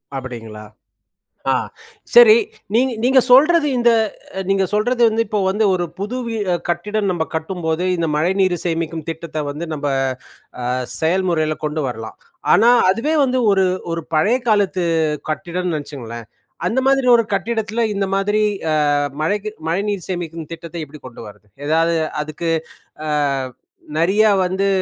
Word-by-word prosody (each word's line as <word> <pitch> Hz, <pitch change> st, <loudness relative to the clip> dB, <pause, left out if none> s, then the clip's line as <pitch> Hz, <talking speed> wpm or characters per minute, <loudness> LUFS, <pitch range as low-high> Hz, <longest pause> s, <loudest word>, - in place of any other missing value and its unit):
அப்பிடீங்களா? 115 Hz, -5 st, -7 dB, 0.9 s
ஆ -, -, +4 dB, 0.6 s
சரி, 470 Hz, -2 st, +9 dB, 0.4 s
நீங் 250 Hz, +4 st, +3 dB
நீங்க 260 Hz, +2 st, +5 dB
சொல்றது 305 Hz, +4 st, +6 dB
இந்த 240 Hz, -1 st, +4 dB, 0.6 s
நீங்க 195 Hz, 0 st, +2 dB
சொல்றது 240 Hz, +4 st, +1 dB
வந்து, 220 Hz, +1 st, 0 dB
இப்போ 210 Hz, 0 st, -1 dB
வந்து 210 Hz, +3 st, +1 dB
ஒரு 175 Hz, -1 st, 0 dB
புது 210 Hz, +5 st, -3 dB
வீ 230 Hz, -1 st, -3 dB, 0.2 s
அ -, -, +2 dB
கட்டிடம் 200 Hz, +4 st, -1 dB
நம்ப 165 Hz, -3 st, -1 dB
கட்டும்போது, 160 Hz, 0 st, -2 dB
இந்த 165 Hz, -1 st, 0 dB
மழைநீரு 185 Hz, +3 st, +1 dB
சேமிக்கும் 165 Hz, -2 st, -2 dB
திட்டத்தை 160 Hz, -1 st, -5 dB
வந்து, 150 Hz, +4 st, -5 dB
நம்ப 145 Hz, -1 st, -3 dB, 0.7 s
ஆ -, -, -4 dB, 0.4 s
செயல்முறையில 160 Hz, -2 st, +1 dB
கொண்டு 150 Hz, 0 st, -2 dB
வரலாம். 110 Hz, -3 st, -7 dB, 0.4 s
ஆனா 230 Hz, +3 st, +5 dB, 0.2 s
அதுவே 230 Hz, +11 st, +1 dB
வந்து 260 Hz, -1 st, +1 dB
ஒரு 190 Hz, -1 st, +3 dB, 0.3 s
ஒரு 165 Hz, -, -2 dB
பழைய 205 Hz, +11 st, +3 dB
காலத்து 200 Hz, -4 st, +2 dB, 0.5 s
கட்டிடம்னு 175 Hz, +2 st, -2 dB
நினைச்சுக்கங்களேன். 120 Hz, -6 st, -7 dB, 0.4 s
அந்த 250 Hz, +4 st, +1 dB
மாதிரி 270 Hz, -1 st, +3 dB
ஒரு 230 Hz, -, +3 dB
கட்டிடத்தில, 220 Hz, +3 st, -1 dB
இந்த 195 Hz, 0 st, 0 dB
மாதிரி 205 Hz, +2 st, +1 dB, 0.3 s
அ -, -, +2 dB, 0.5 s
மழைக்கு 205 Hz, +6 st, -1 dB, 0.2 s
மழைநீர் 195 Hz, +1 st, -1 dB
சேமிக்கும் 165 Hz, -3 st, -5 dB
திட்டத்தை 170 Hz, 0 st, -8 dB
எப்படி 150 Hz, +1 st, -14 dB
கொண்டு 120 Hz, -, -11 dB
வரது? 105 Hz, 0 st, -15 dB, 0.2 s
ஏதாவது 165 Hz, +2 st, +2 dB, 0.3 s
அதுக்கு 155 Hz, +2 st, -4 dB, 0.6 s
அ -, -, -1 dB, 0.9 s
நெறியா 205 Hz, +6 st, +4 dB, 0.2 s
வந்து 190 Hz, +2 st, 0 dB
180 Hz, 140 wpm, -19 LUFS, 160-215 Hz, 0.9 s, சரி